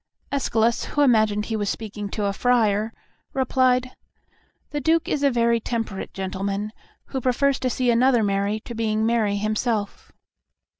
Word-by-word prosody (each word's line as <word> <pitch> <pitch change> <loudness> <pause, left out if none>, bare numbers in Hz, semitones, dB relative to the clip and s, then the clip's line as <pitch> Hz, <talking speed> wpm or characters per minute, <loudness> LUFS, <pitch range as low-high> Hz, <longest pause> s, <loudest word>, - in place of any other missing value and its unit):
Escalus, 235 -4 +1
who 290 - +1
imagined 215 -5 +3
he 225 - -3
was 205 -2 -1
speaking 210 -2 -5
to 210 0 -2
a 200 - 0
friar, 220 -2 +2 0.4
replied, 255 -1 +2 0.8
"The 295 0 -2
Duke 325 +3 +2
is 290 - -1
a 280 - +4
very 235 -2 +2
temperate 225 -4 -4
gentleman, 195 +2 -3 0.4
who 265 - -3
prefers 270 +2 +1
to 255 - 0
see 250 0 +1
another 240 0 +4
merry 200 +1 0
to 240 - -8
being 220 -1 0
merry 225 -3 +1
himself." 215 0 -2
225 Hz, 150 wpm, -23 LUFS, 210-255 Hz, 0.8 s, a